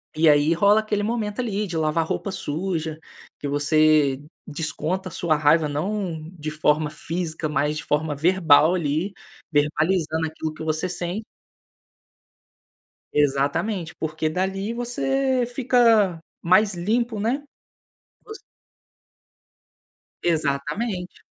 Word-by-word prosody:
E 160 +1 +5
aí 145 +2 +4
rola 200 +5 +4
aquele 215 -1 -1
momento 215 -1 -2
ali, 210 -4 -1
de 175 - -6
"lavar 160 +1 +1
roupa 200 - -3
suja", 160 -2 -3 0.4
que 145 - -4
você 145 -1 +3 0.3
desconta 165 +4 -3
a - - -15
sua 165 -3 +1
raiva, 150 +1 +3
não 160 +1 -3
de 155 -4 -6
forma 155 0 +1
física, 160 +1 -4
mas 150 0 0
de - - -5
forma 150 0 -1
verbal 160 0 +4
ali, 170 +3 -1 0.4
verbalizando 160 +2 +1
aquilo 155 0 -5
que 160 - -8
você 160 +2 -1
sen 180 +4 -4 1.9
Exatamente, 150 +6 0
porque 155 0 -2
dali 195 +5 -2
você 255 +2 0
fica 235 -7 +3 0.2
mais 195 +4 +4
limpo, 220 +5 -1
né, 245 +7 -1 0.8
você 435 +1 -9 1.8
Exatamente. 170 +5 -2
165 Hz, 110 wpm, -23 LUFS, 155-205 Hz, 1.9 s, E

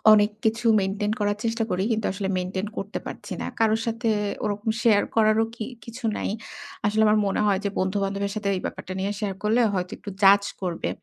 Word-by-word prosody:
অনেক 210 0 +5
কিছু 225 +2 +1
মেইনটেইন 200 +2 -1
করার 205 0 +1
চেষ্টা 230 0 0
করি। 185 +1 0
কিন্তু 220 -1 0
আসলে 195 0 -3
মেইনটেইন 185 +2 -2
করতে 200 +2 -4
পারছি - - -7
না। - - -3
কারো 220 -1 +4
সাথে 230 0 0 0.3
ওরকম 210 +1 -2
শেয়ার 215 -3 +5
করারও 220 0 +4
কি 220 - -4 0.2
কিছু 230 +2 -10
নাই। - - -2 0.6
আসলে 215 +1 +2
আমার 215 0 +4
মনে - - 0
হয় 195 -2 +3
যে, - - +2
বন্ধু-বান্ধবের 195 +1 -1
সাথে 210 -2 -1
এই - - -3
ব্যাপারটা 185 - -6
নিয়ে 195 +2 -1
শেয়ার 200 -3 -2
করলে 220 +3 +3
হয়তো 180 -1 -2
একটু 205 - -7
জাজ 200 +1 +7 0.2
করবে। 175 -3 -2
205 Hz, 195 wpm, -25 LUFS, 195-220 Hz, 0.6 s, জাজ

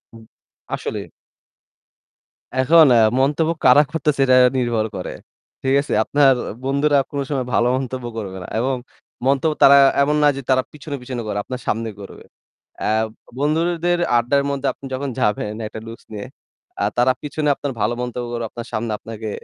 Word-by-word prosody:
উ - - -11 0.6
আসলে। - - -5 1.5
এখন 155 +5 +6
এ্যা 115 - +5 0.2
মন্তব্য 150 +4 +2
কারা 130 +4 +7
করতেছে 150 -3 0
এটা 130 -1 +5 0.2
নির্ভর 120 -3 0
করে। 90 - -5 0.5
ঠিক 135 0 +1
আছে? 145 - -4
আপনার 140 -2 +4 0.3
বন্ধুরা 140 +2 +2
কোন 145 - -3
সময় 135 -4 -1
ভালো 120 - +3
মন্তব্য 130 -1 -4
করবে 95 -3 -5
না। - - -9
এবং 130 +2 0 0.5
মন্তব্য 140 +3 +2
তারা 140 +1 +9 0.2
এমন 150 +2 +2
না - - +6
যে - - -4
তারা 130 -1 +3
পিছনে, 150 -1 -7
পিছনে 125 -1 -5
করে 105 -1 -3
আপনার 125 +2 -6
সামনে 115 +1 -1
করবে। 100 - -11 0.6
এ্যা - - 0 0.5
বন্ধুদের 170 +4 +1 0.2
আড্ডার 140 +4 +2
মধ্যে 140 -1 -2
আপনি - - -13
যখন 135 +1 -3
যাবেন 105 -2 0
একটা 110 - -8
লুকস 115 - -10
নিয়ে। 105 -1 -6 0.5
এ্যা 100 - 0
তারা 125 +2 +4
পিছনে 150 0 -2
আপনার 140 0 -4
ভালো 110 +3 +1
মন্তব্য 125 0 -4
করে 120 -1 -3
আপনার 120 +2 -8
সামনে 110 +1 -2
আপনাকে 110 -1 -7
130 Hz, 165 wpm, -20 LUFS, 120-145 Hz, 1.5 s, তারা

